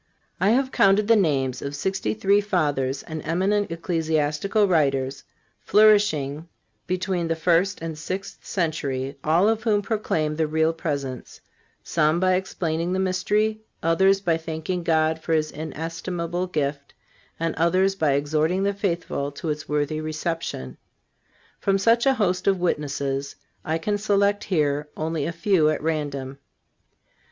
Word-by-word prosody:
I 195 - +3
have 260 +3 +2
counted 200 +1 +4
the 230 - +6
names 135 - +1
of 140 +1 -4
sixty 190 +8 -2
three 200 0 +3
Fathers 145 -9 0
and 160 -2 -6
eminent 190 +5 0
Ecclesiastical 165 +4 0
writers 140 -6 +1 0.4
flourishing 175 -9 +3 0.4
between 185 -1 -1
the 165 - 0
first 175 +3 +1
and 165 -1 -4
sixth 185 +6 -6
century 140 -6 -2
all 165 +6 +3
of 225 0 +1
whom 210 -3 +1
proclaim 160 -9 -1
the 160 -1 +1
Real 160 +1 +1
Presence—some 150 +2 -3
by 185 0 +3
explaining 175 -2 -1
the 190 - 0
mystery, 210 +4 0 0.2
others 190 +4 +3
by 170 -4 +1
thanking 165 +2 -4
God 160 -1 +1
for 165 - -1
his 155 -1 +1
inestimable 165 +3 -4
gift, 140 -4 -3 0.4
and 165 0 -1
others 185 +4 +2
by 155 -7 +1
exhorting 155 +6 +1
the 200 0 +1
faithful 170 -7 -2
to 160 +3 -5
its 150 0 -4
worthy 150 +1 -1
reception. 155 - -4 0.8
From 195 -1 +2
such 230 +5 +3
a 270 - +4
host 185 -5 0
of 195 -1 +4
witnesses 140 -4 -2 0.3
I 160 +1 -1
can 205 +5 -1
select 205 0 +1
here 150 -4 0
only 155 -2 -2
a - - -2
few 170 -2 +2
at 155 - 0
random. 140 -4 -3
165 Hz, 140 wpm, -24 LUFS, 150-195 Hz, 0.8 s, the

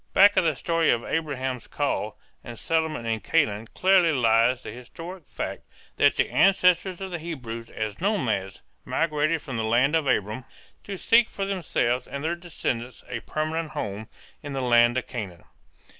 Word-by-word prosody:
Back 200 +1 +7
of - - +4
the 160 -3 +1
story 165 +3 +1
of 120 0 +2
Abraham's 130 -6 -2
call - - -2 0.3
and 120 -1 -9
settlement 160 -5 -1
in 115 -1 -1
Canaan 110 -7 +1
clearly 185 - +4
lies 120 -1 +3
the - - -6
historic 165 - -10
fact - - -5 0.4
that - - +4
the - - +1
ancestors 180 -1 +3
of 190 -1 -5
the 175 - -3
Hebrews 120 -9 -6
as 110 +2 -5
nomads 120 - -1 0.2
migrated 155 0 0
from 130 -4 -5
the 110 - -1
land 125 +7 +3
of 160 -3 +1
Aram 110 0 0 0.4
to 200 -1 -5
seek 230 +4 +4
for 195 - -3
themselves 130 -10 -1
and 140 +1 -6
their 165 +2 0
descendants 130 -8 -4
a 120 -2 -3
permanent 155 +6 -3
home 105 +2 -4 0.3
in 145 -1 -6
the 135 - -2
land 120 -1 +4
of 130 - -1
Canaan. 100 -9 -6
140 Hz, 170 wpm, -25 LUFS, 115-165 Hz, 0.4 s, Back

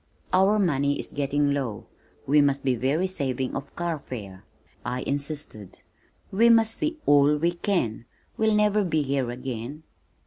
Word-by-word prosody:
"Our 190 +3 +4
money 145 -7 +1
is - - -4
getting 145 0 +1
low. 125 -8 -3 0.4
We 145 +2 +4
must 140 -1 +1
be 130 - +2
very 135 +9 0
saving 135 -8 -2
of 140 +1 -6
carfare," 125 - -5 0.4
I 125 +1 -3
insisted. 140 - -4 0.5
"We 230 +5 +4
must 225 -1 +5
see 310 +6 -2
all 145 +1 +5
we 170 +3 +1
can. 170 - -1 0.3
We'll 220 -1 +2
never 210 0 +3
be 155 -5 0
here 135 -2 -1
again." 125 +3 -6
145 Hz, 145 wpm, -25 LUFS, 130-180 Hz, 0.5 s, must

